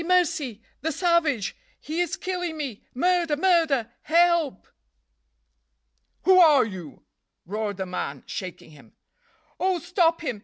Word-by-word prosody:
mercy! 310 - +1 0.2
the 320 +4 -1
savage! 325 - +1 0.2
he 320 +3 -3
is 350 - -1
killing 355 -3 -4
me! 270 -9 -5
murder! 345 0 +2
murder! 320 -9 +2
help!" 335 - +2 1.6
"Who 370 +2 +6
are 305 -8 +7
you?" 185 -8 -9 0.4
roared 205 +1 -3
the 190 - -3
man, 145 -6 -5
shaking 180 -3 -7
him. 145 -3 -18 0.7
"Oh, 375 0 +1
stop 340 0 +1
him! 255 -9 -3
315 Hz, 120 wpm, -25 LUFS, 220-345 Hz, 1.6 s, are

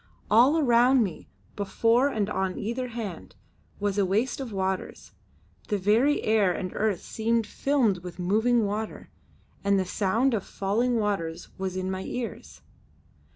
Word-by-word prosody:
All 250 +9 +6
around 250 -2 +4
me, 185 -6 -6 0.3
before 230 +5 +2
and 215 -6 -1
on 190 -2 -2
either 240 +4 -3
hand, 225 -8 -7 0.4
was 205 0 0
a - - +4
waste 215 +9 0
of 260 -4 -5
waters; 190 -1 -3 0.6
the 210 - 0
very 220 +9 +2
air 215 -4 +3
and 185 +1 -4
earth 210 -4 -1
seemed 230 0 0
filmed 235 -5 +1
with 175 -1 -9
moving 220 +6 +2
water, 210 +2 -4 0.5
and 200 0 +3
the 190 - 0
sound 220 +8 +1
of 205 -4 -1
falling 230 +6 0
waters 200 -7 -2
was 190 -1 -3
in 185 0 -2
my 190 0 -3
ears. 180 - -6
210 Hz, 150 wpm, -27 LUFS, 190-235 Hz, 0.6 s, All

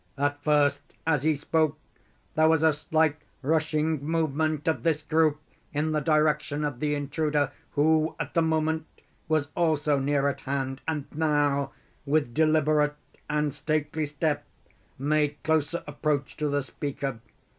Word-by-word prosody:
At 145 +1 0
first, 145 -1 +3 0.2
as 155 -4 +2
he 155 +1 +2
spoke, 155 +1 +1 0.6
there 155 0 +4
was 160 -1 +3
a 160 -1 +5
slight 155 +1 +1 0.3
rushing 155 0 +1
movement 155 -1 0
of 160 - +1
this 160 -3 +1
group 155 -1 +2 0.3
in 150 +2 0
the 155 - +1
direction 150 -1 +1
of 145 -5 -2
the 150 0 0
intruder, 145 0 0 0.2
who 155 +2 +3
at - - -4
the 165 - +3
moment 160 0 0 0.4
was 155 -2 +1
also 150 -4 +2
near 140 +1 +1
at 140 - -2
hand, 135 -1 -3
and 155 -3 -1
now, 145 -3 +1 0.4
with 140 -4 +1
deliberate 155 0 +3 0.3
and 150 -1 0
stately 155 0 -1
step, 145 +1 -1 0.5
made 150 +1 +1
closer 160 +1 +1
approach 145 -1 -2
to 150 - 0
the 145 0 0
speaker. 135 -2 -4
150 Hz, 145 wpm, -27 LUFS, 145-155 Hz, 0.6 s, a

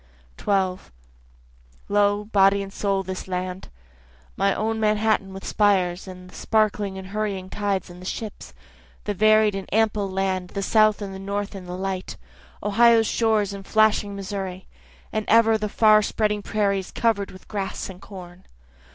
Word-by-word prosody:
12 190 -2 -1 1.0
Lo, 205 0 +2
body 200 -1 +3
and 195 0 -10
soul 195 -1 0
this 185 0 -6
land, 185 0 -4 0.7
My 195 0 +2
own 220 +2 -1
Manhattan 215 -2 +1
with 195 0 -9
spires, 190 -3 +1
and 180 -1 -10
the 185 - -16
sparkling 210 -3 0
and 190 0 -8
hurrying 200 -3 -3
tides, 200 -2 -1
and 175 0 -12
the - - -10
ships, 220 +1 -6 0.5
The 205 - -2
varied 215 +1 +4
and 195 -1 -6
ample 210 -2 +1
land, 190 -1 -1
the 200 - -1
South 215 0 +3
and 195 -1 -6
the 190 - -7
North 200 +1 -3
in 190 -2 -8
the 180 0 -5
light, 190 -1 -4 0.5
Ohio's 225 +2 +5
shores 215 -3 +1
and 200 0 -7
flashing 215 -1 +2
Missouri, 190 -1 -5 0.5
And 215 -1 0
ever 225 0 +5
the 210 -1 -2
far 215 0 +5
spreading 210 0 0
prairies 200 -3 -1
cover'd 215 -4 0
with 185 - -14
grass 200 -2 -4
and 185 -1 -11
corn. 180 -2 -11
200 Hz, 160 wpm, -24 LUFS, 190-215 Hz, 1.0 s, Ohio's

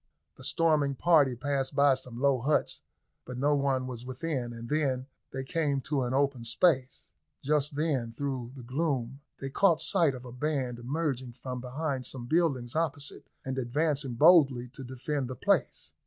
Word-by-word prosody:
The - - -13
storming 150 -4 +2
party 145 -4 +4
passed 135 +2 -2
by 140 -1 +5
some 125 -2 -6
low 140 -1 +3
huts, 150 +4 0 0.4
but 125 - -7
no 145 +3 +2
one 135 -2 +1
was 125 -2 -6
within, 130 -1 -3
and 115 0 -8
then 135 -3 0 0.3
they 135 0 -4
came 145 0 0
to 140 0 -1
an 125 -1 -1
open 140 -3 +1
space. 130 +2 +1 0.3
Just 150 0 +1
then, 140 -7 0
through 130 -1 -4
the 130 - -9
gloom, 135 -1 -2 0.2
they 135 0 -5
caught 170 0 +4
sight 165 -4 +2
of 125 0 -10
a 125 - -8
band 125 -2 -2
emerging 130 -1 -2
from 125 0 -6
behind 130 +1 -3
some 125 -3 -5
buildings 135 -5 0
opposite, 145 -3 -2 0.2
and 130 0 -2
advancing 135 0 -1
boldly 135 -5 +5
to 130 +2 -10
defend 130 +2 -3
the 130 - -5
place. - - 0
135 Hz, 170 wpm, -29 LUFS, 125-150 Hz, 0.4 s, by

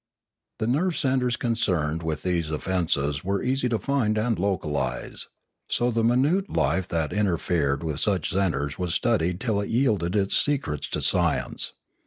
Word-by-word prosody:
The 110 - -1
nerve 155 +9 +1
centres 130 -2 +1
concerned 90 -10 0
with 80 -2 -3
these 85 -4 0
offences 75 -3 -1
were 100 +1 -1
easy 130 0 +1
to 115 - +1
find 115 -5 0
and 110 -1 0
localise; 75 -8 -2 0.4
so 120 +1 +1
the 115 0 0
minute 145 - +2
life 95 -2 +1
that 80 -4 -1
inter 100 -5 +1
fered 75 -4 0
with 80 -3 -2
such 95 -6 +1
centres 80 -6 -1
was 90 -2 -1
studied 90 -7 +1
till 110 -4 0
it 100 - -4
yielded 110 -8 +1
its 100 -1 +2
secrets 130 - 0
to - - -2
science. - - +1
100 Hz, 160 wpm, -25 LUFS, 80-120 Hz, 0.4 s, minute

